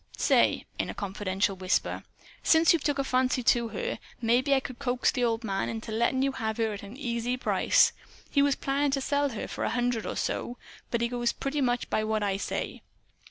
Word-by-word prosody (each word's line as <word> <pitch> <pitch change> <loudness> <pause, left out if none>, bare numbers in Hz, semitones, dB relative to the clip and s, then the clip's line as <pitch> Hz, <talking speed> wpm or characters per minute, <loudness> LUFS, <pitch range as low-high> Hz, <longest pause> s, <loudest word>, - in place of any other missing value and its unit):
Say," - - +3
in - - -1
a - - -5
confidential 195 -1 -1
whisper, 185 0 -1 0.4
"since 325 +1 +5
you've 330 - 0
took 290 -1 +1
a 275 - +1
fancy 255 -1 +1
for 235 -1 +3
her, 480 - -3 0.2
maybe 245 +4 +3
I - - +3
could 255 -2 -8
coax 250 -2 +1
the 250 - -1
old 230 -1 +1
man 195 -3 -1
into 225 0 -5
lettin' 235 +4 +1
you 275 - +2
have 220 -4 -3
her 225 -2 0
at 205 - -7
an 205 +5 -10
easy 240 -2 -2
price. - - +3 0.4
He 280 - +3
was 280 -1 +3
plannin' 280 +1 0
to 275 - +1
sell 285 +1 +1
her 225 -5 -5
for - - -5
a - - +1
hundred 245 -2 0
or - - -3
so. 245 - -2 0.3
But 235 - -1
he 235 - +2
goes 240 0 0
pretty 280 +1 -2
much 245 -2 0
by 215 - +1
what 215 -1 0
I 195 -1 0
say. - - -4
245 Hz, 215 wpm, -28 LUFS, 220-275 Hz, 0.4 s, since